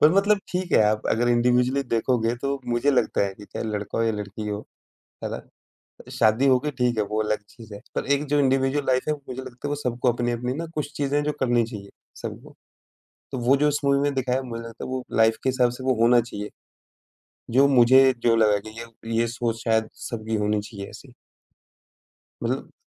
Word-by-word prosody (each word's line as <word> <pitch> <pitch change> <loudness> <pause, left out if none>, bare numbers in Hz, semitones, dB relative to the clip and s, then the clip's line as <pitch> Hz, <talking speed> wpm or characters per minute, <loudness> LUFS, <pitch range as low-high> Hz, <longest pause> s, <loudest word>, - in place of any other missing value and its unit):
पर 150 - +7
मतलब 200 +1 +3
ठीक 180 -1 -3
है, - - +6
आप 105 0 +1
अगर 120 +2 +2
इंडिविजुअली 125 +3 +2
देखोगे 115 -1 0
तो 140 0 -1
मुझे 120 +4 +2
लगता 130 - +1
है 95 - -6
कि 105 - -12
चाहे 100 +3 -6
लड़का 105 0 -3
हो - - +2
या 115 - +1
लड़की 105 +1 -6
हो, 105 0 -4 0.6
है - - -2
ना? - - -5 0.7
शादी 110 +5 +3
हो 130 -1 +5
गई 150 +2 -3
ठीक 125 -3 0
है, 105 - +2
वो 105 +1 -2
अलग 105 0 -1
चीज़ 110 -3 -13
है। 100 - -8 0.2
पर - - -1
एक 140 +1 0
जो 145 0 +3
इंडिविडुअल 135 +1 +2
लाइफ़ 130 +3 +1
है - - +3
मुझे 130 -2 -8
लगता 125 +2 -7
है, - - -3
वो 145 - -1
सबको 125 -3 0
अपनी-अपनी 120 +1 -2
ना 165 - -3
कुछ 150 -1 -3
चीज़ें 145 0 0
हैं 145 - +1
जो 150 - +1
करनी 120 -2 +2
चाहिए, 105 -4 -9 0.3
सबको। - - -8 0.8
तो 130 - -3
वो 135 +3 +5
जो 150 +2 +3
उस 145 - 0
मूवी 140 0 +3
में 145 0 0
दिखाया 130 0 0
मुझे 115 -2 -6
लगता 115 0 -8
है - - -7
वो 130 -1 -3 0.2
लाइफ़ 110 0 +5
के - - +2
हिसाब 125 -2 +2
से 130 - -8
वो 130 - +2
होना 120 +1 +6
चाहिए। 105 -3 -6 1.0
जो 135 +4 +5
मुझे 130 +1 +6
जो 115 -1 +5
लगा 105 -2 +4
कि 110 +2 -9
ये 115 0 -6
ये 115 - +2
सोच 115 -1 -2
शायद 110 -1 +2 0.2
सबकी 110 -1 -4
होनी 105 0 0
चाहिए 100 -2 -8
ऐसी। - - -13 1.3
मतलब 125 +3 -3
120 Hz, 215 wpm, -24 LUFS, 110-135 Hz, 1.3 s, पर